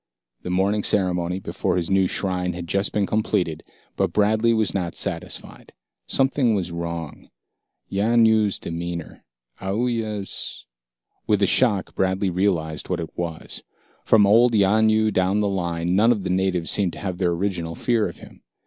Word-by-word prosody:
The - - -6
morning 100 +3 +1
ceremony 90 -3 0
before 95 - -2
his 85 +1 -2
new 95 -1 +3
shrine 90 -2 -1
had 85 0 -6
just 100 +4 0
been 105 -1 +1
completed, 90 -7 -1 0.3
but - - 0
Bradley 110 +2 +2
was 110 -3 +1
not 90 -4 -2
satisfied. - - -4 0.3
Something 135 -4 +2
was 90 -3 -2
wrong. 85 -2 -6 0.6
Yanyoo's 110 0 +3
demeanor, 85 0 -6 0.4
Aoooya's 105 - -2 0.6
With 105 -1 +2
a - - +6
shock, 105 -2 +1
Bradley 95 0 0
realized 85 -5 -1
what - - -1
it 80 - -6
was. 85 -2 -5 0.4
From 105 -2 +5
old 115 +3 +5
Yanyoo 110 +2 +3
down 95 +2 +2
the 105 - +1
line, 85 -2 -1
none 110 +4 +5
of 105 -5 0
the 90 - -2
natives 90 -2 0
seemed 95 -4 0
to - - -9
have 95 -3 -4
their 90 -2 +2
original 85 -2 -2
fear 115 +1 +1
of - - -12
him. - - -15
95 Hz, 155 wpm, -23 LUFS, 90-105 Hz, 0.6 s, a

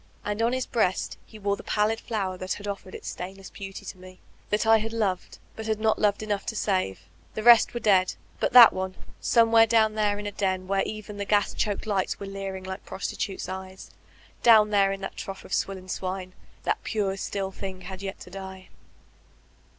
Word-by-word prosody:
And 210 +1 -2
on 230 +1 +3
his 255 0 -1
breast 200 -6 0
he 220 - -12
wore 200 -1 0
the - - -10
pallid 215 +1 +1
flower 195 -5 -2
that 185 0 -3
had 205 - -8
offered 195 -2 -6
its - - -8
stainless 190 +1 -7
beauty 195 -1 -8
to 185 - -8
me, 185 0 -13 0.3
that 210 +1 +1
I 225 0 +7
had 225 +1 -4
toved,— 195 -5 -1 0.2
«nd 220 - -5
had 220 -1 0
not 220 0 +2
loved 210 0 +2
enough 205 -2 -2
to 230 - -2
save. 185 - 0 0.3
The 215 - -3
rest 235 0 +7
were - - -1
dead; 190 -4 +3 0.2
but - - +1
that 245 -2 +10
one 185 0 -3 0.2
— - - -28
somewhere 230 -1 +5
down 220 -1 +4
there 210 -1 +1
in 205 - -6
a 205 - -3
den 190 -2 -1
where 195 0 +1
even 215 -1 -7
the 200 - -3
gas 205 0 +2
choked 205 -2 -1
lights 200 -3 -1
were 200 - -5
leering 195 -1 -5
like 190 +1 -6
prostitutes* 195 0 -4
eyes, 190 0 -8 0.5
down 215 -3 +6
there 200 -1 +4
in 195 0 -4
that 195 - -6
trough 195 0 -7
of - - -7
swill 195 -1 0
and 185 0 -9
swine, 185 0 -4 0.3
that - - -1
pure, 200 -4 -1
still 195 0 -3
thing 190 -1 -7
had 190 +1 -8
yet 195 -1 -5
to 180 - -11
die. 190 -1 -9
200 Hz, 210 wpm, -26 LUFS, 190-215 Hz, 0.5 s, that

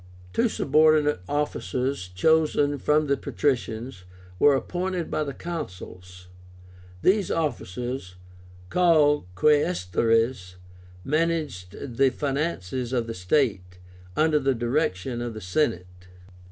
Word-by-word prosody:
Two 235 - +2
subordinate 150 - +3
officers, 140 -6 -2
chosen 145 - +2
from 150 +3 +2
the 140 -1 +2
patricians, 120 -7 -2 0.4
were 145 -1 +6
appointed 180 +4 -3
by 155 - 0
the 140 - -4
Consuls. 90 - -8 0.8
These 200 0 +3
officers, 125 - -3 0.6
called 155 - +4
QUAESTÓRES, 115 - +1 0.5
managed 145 - -2
the 135 -1 +5
finances 130 - -3
of 120 -2 0
the 115 - -5
state, 90 -3 0 0.4
under 155 -1 +3
the 135 -1 +1
direction 120 - -1
of 120 -2 -4
the - - -5
Senate. 90 - 0
135 Hz, 100 wpm, -25 LUFS, 100-155 Hz, 0.8 s, were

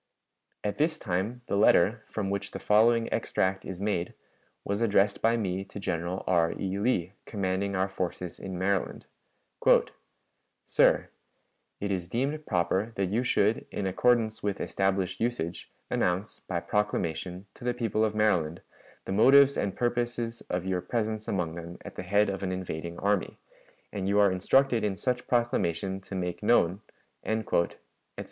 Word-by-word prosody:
At 105 +5 -2
this 155 +1 +2
time 105 +3 -2
the - - -2
letter, 105 +2 +4
from 100 -3 -3
which 100 0 -2
the - - -6
following 115 +2 +4
extract 95 0 0
is 95 -2 -6
made, 100 -4 -1 0.5
was 100 +2 -1
addressed 100 -2 +3
by 115 +1 +3
me 95 -3 -2
to 100 - -9
General 90 -1 -2
R. 85 -2 +2
E. 95 0 -2
Lee, 100 -5 0
commanding 100 -1 -1
our 95 +1 +1
forces 90 -2 -4
in 95 -2 -5
Maryland: 95 0 -1 1.6
"SIR: - - +3 0.7
It 100 0 -2
is 90 -2 -2
deemed 140 +7 -2
proper 95 +4 0
that 95 -1 -1
you 115 +4 +2
should, 110 -3 +1
in 100 - -3
accordance 110 +3 +2
with 100 -1 -2
established 95 -1 -1
usage, 100 -8 -2 0.2
announce, 90 +4 0
by 90 -2 -3
proclamation, 95 -3 -2
to - - -14
the 120 0 0
people 115 -3 0
of 110 -1 0
Maryland, 90 -7 +1 0.4
the - - -4
motives 135 +7 +6
and 100 -1 -1
purposes 120 -1 -1
of 90 0 -2
your 95 -1 0
presence 110 -1 -2
among 90 -5 -1
them 85 +1 -8
at - - -7
the - - -6
head 100 +3 +2
of 100 -1 -3
an 95 -2 -2
invading 85 -2 -5
army; 100 0 0 0.6
and 95 -1 -2
you 100 - +2
are 100 -2 +5
instructed 120 +6 +3
in 100 -2 -1
such 125 +3 -2
proclamation 95 -6 0
to 95 - -8
make 90 -2 -3
known," 105 -3 +3 0.4
etc. 110 -6 0
100 Hz, 155 wpm, -28 LUFS, 90-110 Hz, 1.6 s, motives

